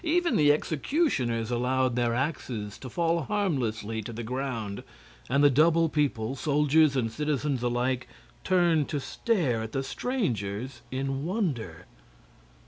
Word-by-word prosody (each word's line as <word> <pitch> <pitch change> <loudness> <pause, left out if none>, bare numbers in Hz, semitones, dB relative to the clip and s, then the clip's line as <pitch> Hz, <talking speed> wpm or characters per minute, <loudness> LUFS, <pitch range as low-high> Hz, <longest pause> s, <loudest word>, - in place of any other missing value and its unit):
Even 345 +1 +2
the 145 -1 +5
executioners 140 - 0
allowed 125 +1 +1
their 120 -1 +1
axes 125 -7 -3
to 130 - -8
fall 170 +4 +1
harmlessly 125 - -1
to 110 - -7
the 115 +1 -6
ground, 115 -4 -3 0.5
and 140 +3 +3
the 145 - +8
double 165 +4 +4
people, 135 -5 0
soldiers 150 +1 +3
and 115 -4 0
citizens 145 -1 -1
alike, 125 +1 0 0.4
turned 170 -5 +3
to 145 - -1
stare 145 - 0
at 110 0 -6
the 135 - -1
strangers 125 - -3
in 135 +1 -2
wonder. 150 - -2
135 Hz, 135 wpm, -28 LUFS, 120-155 Hz, 0.5 s, the